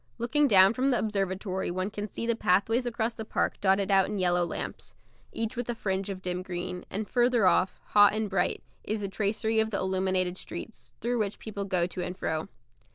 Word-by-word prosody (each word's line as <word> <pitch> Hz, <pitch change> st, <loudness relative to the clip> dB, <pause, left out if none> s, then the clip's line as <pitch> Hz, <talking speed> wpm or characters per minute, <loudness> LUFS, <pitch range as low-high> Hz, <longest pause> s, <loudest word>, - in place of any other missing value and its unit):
Looking 260 Hz, +5 st, +2 dB
down 195 Hz, -3 st, +7 dB
from 260 Hz, +3 st, +1 dB
the 250 Hz, -, +3 dB
observatory 195 Hz, -2 st, -2 dB
one 185 Hz, +3 st, -2 dB
can 205 Hz, 0 st, -5 dB
see 230 Hz, -, -4 dB
the 235 Hz, 0 st, +1 dB
pathways 225 Hz, +5 st, +2 dB
across 230 Hz, -1 st, -1 dB
the 220 Hz, -, -6 dB
park -, -, -1 dB
dotted 195 Hz, 0 st, +2 dB
out 195 Hz, -1 st, +5 dB
in 210 Hz, -, -3 dB
yellow 180 Hz, -1 st, +2 dB
lamps, 170 Hz, -, -5 dB, 0.4 s
each 225 Hz, +2 st, -3 dB
with 245 Hz, 0 st, -4 dB
a 240 Hz, -, -1 dB
fringe 195 Hz, -2 st, -2 dB
of 190 Hz, -1 st, -6 dB
dim 180 Hz, 0 st, -2 dB
green; 180 Hz, 0 st, -5 dB
and 210 Hz, +1 st, -3 dB
further 240 Hz, -3 st, +3 dB
off, 185 Hz, +1 st, +3 dB
hot 205 Hz, 0 st, +6 dB
and 215 Hz, 0 st, -1 dB
bright, 190 Hz, -3 st, 0 dB, 0.2 s
is 215 Hz, 0 st, -2 dB
the 200 Hz, -, -2 dB
tracery 215 Hz, +3 st, 0 dB
of 220 Hz, 0 st, +2 dB
the 205 Hz, -, -2 dB
illuminated 185 Hz, -1 st, 0 dB
streets, 210 Hz, +6 st, -8 dB
through 240 Hz, +1 st, 0 dB
which 205 Hz, -2 st, 0 dB
the -, -, -20 dB
people 200 Hz, -2 st, -4 dB
go 185 Hz, -3 st, +1 dB
to 180 Hz, 0 st, -5 dB
and 180 Hz, +1 st, -5 dB
fro. 160 Hz, -3 st, -2 dB
200 Hz, 215 wpm, -28 LUFS, 185-225 Hz, 0.4 s, down